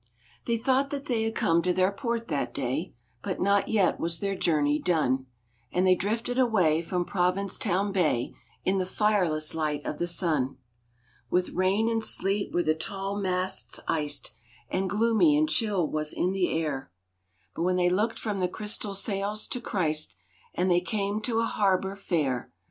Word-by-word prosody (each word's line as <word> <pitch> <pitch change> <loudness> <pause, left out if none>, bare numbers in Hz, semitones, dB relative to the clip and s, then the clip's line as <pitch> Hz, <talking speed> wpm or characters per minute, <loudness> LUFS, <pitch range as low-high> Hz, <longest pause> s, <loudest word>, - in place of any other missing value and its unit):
They 235 -1 +1
thought 265 +4 +1
they 275 -5 -2
had 225 - -2
come 165 +1 +3
to 180 - +1
their 185 +2 +2
port 235 +1 -3
that 145 -3 -2
day, 140 +6 -2 0.3
But 190 -3 -3
not 200 +1 +2
yet 200 -5 +2
was 165 0 -1
their 195 +1 -1
journey 150 -4 +2
done; 135 -7 +1 0.4
And 180 +1 +2
they 185 - +6
drifted 230 +7 -1
away 185 -11 +3
from 175 +1 -2
Provincetown 190 +1 0
Bay 155 -11 +1 0.3
In 190 +1 +2
the 185 - -1
fireless 185 -8 +1
light 150 -2 -2
of 150 - -4
the 175 - 0
sun. 160 -6 0 0.7
With 180 +4 +1
rain 190 +5 +2
and 225 -1 0
sleet 200 -1 +1
were 175 - +1
the 155 - +3
tall 195 +5 -4
masts 185 -1 0
iced, 145 -6 -1 0.4
And 190 0 0
gloomy 230 - +3
and 310 +1 +3
chill 205 - +1
was 155 0 -2
the 185 0 +1
air, 150 - -2 0.7
But 180 +2 +1
they 180 -1 +3
looked 210 +5 +1
from 210 -3 -3
the 180 - +2
crystal 210 0 -3
sails 200 +1 -1
to 250 - -2
Christ, 155 - -1 0.4
And 180 +1 +1
they 175 0 +4
came 200 +3 -2
to 225 +1 0
a - - +1
harbor 195 -2 +1
fair. 155 - -1
185 Hz, 165 wpm, -27 LUFS, 165-210 Hz, 0.7 s, they